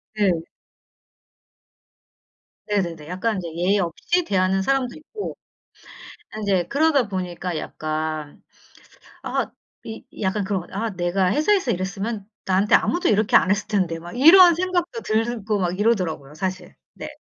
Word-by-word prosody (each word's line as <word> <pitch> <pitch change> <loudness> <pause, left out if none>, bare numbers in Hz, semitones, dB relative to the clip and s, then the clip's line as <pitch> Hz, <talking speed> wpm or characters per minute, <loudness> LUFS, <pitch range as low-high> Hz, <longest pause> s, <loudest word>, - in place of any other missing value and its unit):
네. 205 -3 +3 2.4
네네네. 170 -7 -2
약간 190 +5 -1
이제 175 -2 -4
예의 185 +4 +2
없이 195 - 0
대하는 190 - +1
사람도 260 +2 0
있고. 410 +8 -7 1.0
인제 195 -5 0
그러다 285 -4 +2
보니까 180 -3 -4
약간 155 -1 -4 0.8
아 - - -2 0.3
이 220 0 -8 0.2
약간 200 +1 0
그런 195 -1 -1
것 170 - -11
같아. 205 +4 -4
'아 225 - -1
내가 180 0 0
회사에서 340 -1 +2
일했으면 195 +2 -3 0.2
나한테 190 +2 +2
아무도 350 +1 +2
이렇게 215 0 +2
안 185 - +4
했을 205 +1 +1
텐데.' 185 -6 0
막 175 +4 -10
이런 340 +7 +8
생각도 365 +5 -1
들고 220 -1 -1
막 180 -1 -1
이러더라고요 175 -10 0
사실. 185 +3 -4 0.2
네. - - -8
200 Hz, 285 characters per minute, -23 LUFS, 180-235 Hz, 2.4 s, 이런